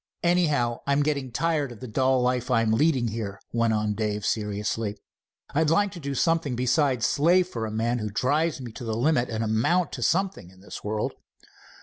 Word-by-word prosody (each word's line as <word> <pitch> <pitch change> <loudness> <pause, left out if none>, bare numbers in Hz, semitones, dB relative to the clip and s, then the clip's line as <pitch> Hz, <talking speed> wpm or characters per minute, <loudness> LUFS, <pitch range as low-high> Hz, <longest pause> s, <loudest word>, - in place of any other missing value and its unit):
"Anyhow, 150 -9 +2
I'm 140 +1 +3
getting 140 -4 -1
tired 150 0 0
of 115 - -11
the 130 - -7
dull 130 +2 +2
life 125 0 0
I'm 115 -3 +2
leading 130 -1 +2
here," 105 -3 -5
went 115 -1 +2
on 105 -1 0
Dave 105 -1 -2
seriously. 105 0 -2 0.6
"I'd 155 +1 +2
like 200 +5 +2
to 180 - -9
do 140 -3 -4
something 165 -4 +1
besides 125 0 +1
slave 175 +6 +3
for 115 -6 -3
a - - -6
man 115 +3 0
who 105 -1 -3
drives 145 +10 0
me 125 -3 -7
to 120 - -9
the 110 -1 -2
limit, 125 -1 +2
and 110 0 -2
amount 120 +11 +1
to 125 - -6
something 185 - 0
in 95 0 -19
the 100 - -10
world." 105 +1 -2
125 Hz, 195 wpm, -26 LUFS, 110-150 Hz, 0.6 s, I'm